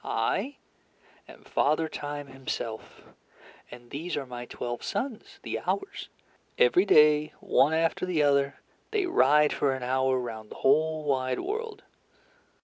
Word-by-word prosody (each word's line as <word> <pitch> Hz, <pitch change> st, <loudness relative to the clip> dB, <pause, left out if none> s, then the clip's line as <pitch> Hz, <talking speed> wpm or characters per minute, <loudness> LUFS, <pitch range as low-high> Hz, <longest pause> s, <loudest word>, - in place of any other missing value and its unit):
I 285 Hz, +1 st, -1 dB, 0.7 s
am -, -, -15 dB
Father 155 Hz, +3 st, +1 dB
Time 145 Hz, -1 st, -5 dB
himself, 130 Hz, -4 st, -6 dB, 0.7 s
and 120 Hz, 0 st, -13 dB
these 160 Hz, +5 st, -4 dB
are 140 Hz, -, -3 dB
my 120 Hz, -1 st, -7 dB
twelve 120 Hz, -1 st, -5 dB
sons, 265 Hz, -, -4 dB
the -, -, -3 dB
Hours. 395 Hz, 0 st, -3 dB, 0.5 s
Every 430 Hz, -6 st, +4 dB
day, 150 Hz, 0 st, +5 dB
one 150 Hz, +4 st, +3 dB
after 165 Hz, +2 st, 0 dB
the 165 Hz, -5 st, +1 dB
other, 140 Hz, -1 st, +2 dB, 0.3 s
they 425 Hz, -3 st, 0 dB
ride 150 Hz, -, +4 dB
for 135 Hz, -2 st, +1 dB
an 130 Hz, -, -6 dB
hour 130 Hz, +1 st, +1 dB
round 110 Hz, -3 st, -6 dB
the -, -, -10 dB
whole 155 Hz, +3 st, +3 dB
wide 130 Hz, -3 st, 0 dB
world. 435 Hz, 0 st, -5 dB
145 Hz, 140 wpm, -28 LUFS, 130-180 Hz, 0.7 s, day